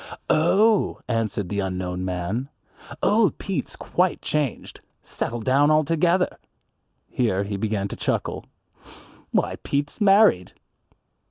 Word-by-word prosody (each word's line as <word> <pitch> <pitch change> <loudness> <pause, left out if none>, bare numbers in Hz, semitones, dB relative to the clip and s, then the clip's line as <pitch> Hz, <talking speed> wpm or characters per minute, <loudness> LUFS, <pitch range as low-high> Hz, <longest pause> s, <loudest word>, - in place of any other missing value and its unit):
"Oh," 195 +7 +3
answered 110 -5 -2
the 100 - -2
unknown 90 -1 -3
man, 95 +8 -3 0.5
"old 215 0 +3
Pete's 195 -2 -4
quite 180 0 0
changed, 150 -6 -3 0.2
settled 115 -1 -4
down 140 +3 +4
altogether." 165 +4 +2 0.7
Here 100 -6 0
he 100 0 -4
began 100 -1 -1
to - - -6
chuckle, - - -2 0.8
"Why, - - 0
Pete's 145 +8 -3
married!" 195 - +4
130 Hz, 105 wpm, -23 LUFS, -, 0.8 s, down